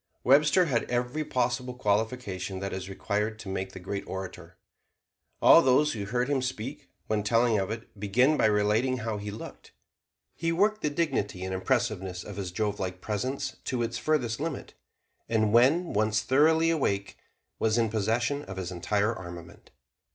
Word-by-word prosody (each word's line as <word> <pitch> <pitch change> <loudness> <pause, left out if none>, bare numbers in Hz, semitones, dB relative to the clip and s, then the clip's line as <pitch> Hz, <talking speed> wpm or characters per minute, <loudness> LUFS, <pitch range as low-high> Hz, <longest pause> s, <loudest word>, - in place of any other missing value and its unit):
Webster 150 +7 +5
had 125 -7 -1
every 125 +5 -1
possible 125 -2 -1
qualification 105 -4 -1
that 100 +1 -4
is 95 0 -5
required 105 +3 -2
to 110 - -10
make 95 0 -3
the 95 - -8
great 100 +2 -4
orator. 95 0 -7 0.9
All - - +9
those 135 +4 +3
who 105 -3 -4
heard 125 +4 0
him 140 -2 +1
speak, 130 +1 -5 0.2
when 110 -1 0
telling 115 +1 +3
of 95 - -2
it, 110 -1 -7
begin 125 +9 +3
by - - +2
relating 105 +5 +2
how 110 -2 -3
he 105 0 -5
looked. 65 - -10 0.6
He 165 0 -1
worked 210 +5 +2
the 150 - +1
dignity 135 - -1
and 95 - -3
impressiveness 95 -4 -1
of - - -9
his 95 -3 -4
Jovelike 95 -2 -2
presence 110 +8 -3
to 125 -3 -1
its 115 - -3
furthest 125 -7 0
limit, 160 -1 -4 0.6
and 110 -2 +2
when 145 +9 +4
once 110 +1 +1
thoroughly 160 +7 +4
awake 100 -11 -1 0.4
was 110 0 +2
in 115 -2 +2
possession 115 +6 0
of 95 0 -8
his 95 -1 -4
entire 105 +5 0
armament. 85 -4 -10
110 Hz, 165 wpm, -28 LUFS, 100-130 Hz, 0.9 s, All